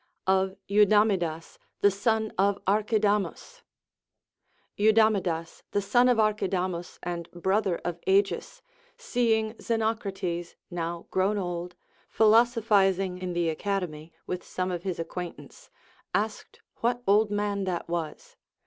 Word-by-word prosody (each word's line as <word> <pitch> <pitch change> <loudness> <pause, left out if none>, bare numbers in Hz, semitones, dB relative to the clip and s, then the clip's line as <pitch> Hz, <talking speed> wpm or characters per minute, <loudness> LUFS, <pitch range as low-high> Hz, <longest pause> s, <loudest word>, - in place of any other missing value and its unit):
Of 190 0 +2
Eudamidas 200 -5 +2 0.2
the 205 - +5
Son 220 +2 0
of 200 +1 +2
ArcJiidamus. 210 - 0 1.1
Eudamidas, 205 -6 +2
the 205 - +2
son 245 +5 +4
of 245 - +3
Archidamus 185 -5 -1
and 170 -1 -4
brother 190 +1 0
of 175 -1 -3
Agis, 195 +1 +1 0.3
seeing 220 -3 0
Xenocrates, 195 -6 -2 0.2
now 170 0 -4
groΛvn 195 +2 +1
old, 175 -1 -4 0.3
philosophizing 210 -5 +3
in 185 -1 -4
the 175 -1 0
Academy 165 -3 -3
with 180 0 -4
some 185 0 -3
of 175 -1 -3
his 185 -1 -3
acquaintance, 180 - -7 0.5
asked 215 +1 -3 0.2
what 245 +1 -1
old 210 +2 +4
man 205 -1 -1
that 180 -2 -3
was. 170 -2 -5
195 Hz, 115 wpm, -27 LUFS, 175-215 Hz, 1.1 s, the